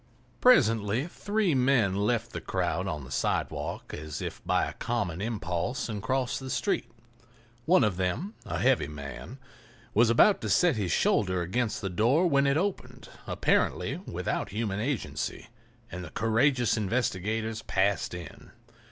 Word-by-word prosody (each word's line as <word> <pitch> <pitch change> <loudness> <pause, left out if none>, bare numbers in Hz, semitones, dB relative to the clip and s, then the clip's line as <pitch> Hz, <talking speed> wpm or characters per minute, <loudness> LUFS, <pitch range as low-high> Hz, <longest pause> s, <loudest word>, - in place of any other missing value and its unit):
Presently 115 - +4
three 205 +1 0
men 125 -7 +3
left 115 +3 0
the - - -5
crowd - - -1
on 75 -3 -3
the 65 - -11
sidewalk - - -2
as 75 0 -6
if - - -6
by - - +2
a - - -6
common 85 +1 -2
impulse 100 +1 -2
and 105 -3 -4
crossed 130 +2 -1
the 130 -1 -7
street. 200 - -1 0.8
One 180 +4 +5
of 105 -5 +1
them, 95 - -2
a - - -4
heavy - - +2
man, 75 - -8 0.6
was 115 +2 +4
about 190 - +5
to - - -3
set 175 -5 +4
his 100 -6 -1
shoulder 95 -3 +2
against 110 +6 -1
the 100 - -2
door 120 - +3
when 140 -4 +3
it 140 +1 +3
opened, 195 +3 -3 0.2
apparently - - +1
without - - -2
human 105 -1 -2
agency, 125 0 -3 0.4
and 90 +1 -6
the 85 - -8
courageous 120 - +2
investigators 110 0 -1
passed 95 -1 0
in. 85 -1 -10
110 Hz, 150 wpm, -28 LUFS, 95-135 Hz, 0.8 s, One